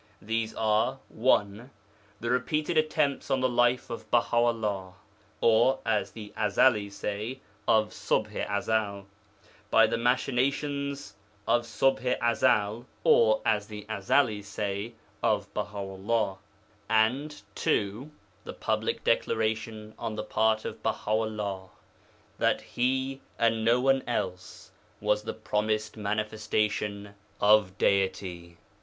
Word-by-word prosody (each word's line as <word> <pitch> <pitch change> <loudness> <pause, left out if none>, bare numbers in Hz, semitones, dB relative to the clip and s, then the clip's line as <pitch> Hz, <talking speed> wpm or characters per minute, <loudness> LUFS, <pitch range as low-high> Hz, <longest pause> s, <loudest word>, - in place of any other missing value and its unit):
These 110 +1 -2
are 110 +4 +1
(1) 110 0 +1 0.5
the 115 +1 -2
repeated 150 +6 0
attempts 155 -3 +1
on 135 - +2
the 130 - +2
life 120 0 +2
of 115 - -7
Baha 120 0 +2
'ullah 105 -6 0 0.5
(or, 115 +4 +4
as 110 -2 +1
the 105 -2 -9
Ezelis 105 -1 +2
say, 105 +6 -4 0.3
of 110 -1 +4
Ṣubḥ - - -2
i 100 - +1
Ezel) 100 -3 -1 0.6
by - - +6
the - - -1
machinations 140 +3 0 0.3
of 120 0 +2
Ṣubḥ 125 +3 +1
i 120 - +2
Ezel 105 +1 +1 0.2
(or, 110 -2 +5
as 105 -2 +1
the 105 -1 -8
Ezelis 105 +1 +1
say, 105 +1 -4 0.3
of - - 0
Baha 105 0 -4
'ullah), 95 +1 -1 0.5
and 125 +7 +1
(2) 105 +10 -1 0.3
the - - -7
public - - -2
declaration 110 -1 -1
on 115 -2 -3
the 105 - -3
part 110 0 +1
of - - -6
Baha - - -2
'ullah 105 -4 -2 0.7
that - - +2
he, 130 +2 -1 0.2
and 115 -1 +2
no 120 +2 +4
one 135 +1 +3
else, 95 -6 -4 0.3
was 105 0 +1
the 105 - -5
Promised 110 0 -1
Manifestation 105 -1 -2 0.3
of 105 -2 +4
Deity. 95 -3 0
110 Hz, 125 wpm, -28 LUFS, 105-120 Hz, 0.7 s, by